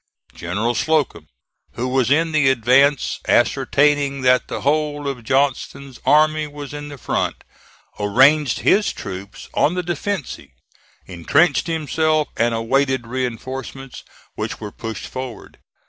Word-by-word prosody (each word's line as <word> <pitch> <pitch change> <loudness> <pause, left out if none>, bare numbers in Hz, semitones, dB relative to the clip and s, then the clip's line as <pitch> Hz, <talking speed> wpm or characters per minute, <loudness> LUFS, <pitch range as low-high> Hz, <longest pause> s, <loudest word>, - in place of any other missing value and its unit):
General 105 +8 -2
Slocum, 145 - 0 0.5
who 125 - -3
was 130 -1 +1
in 160 +3 +2
the 150 -4 +3
advance 130 +3 +3
ascertaining 140 -1 +2
that 125 -1 +3
the - - -5
whole 145 0 0
of 130 -4 -4
Johnston's 135 +1 -1
army 155 0 +4
was 145 -1 -9
in 145 0 -6
the 145 -1 -9
front, - - -2 0.6
arranged 130 +7 +3
his 210 +1 +3
troops 95 +2 -8
on 160 - +2
the 180 - -2
defensive, 175 - -4 0.6
intrenched 135 - +1
himself 155 -1 0
and 115 0 +1
awaited 130 +2 0
reinforcements, 130 +2 -5 0.3
which - - -5
were 105 -2 -7
pushed 110 -2 -6
forward. 130 -5 -8
135 Hz, 125 wpm, -20 LUFS, 120-150 Hz, 0.6 s, army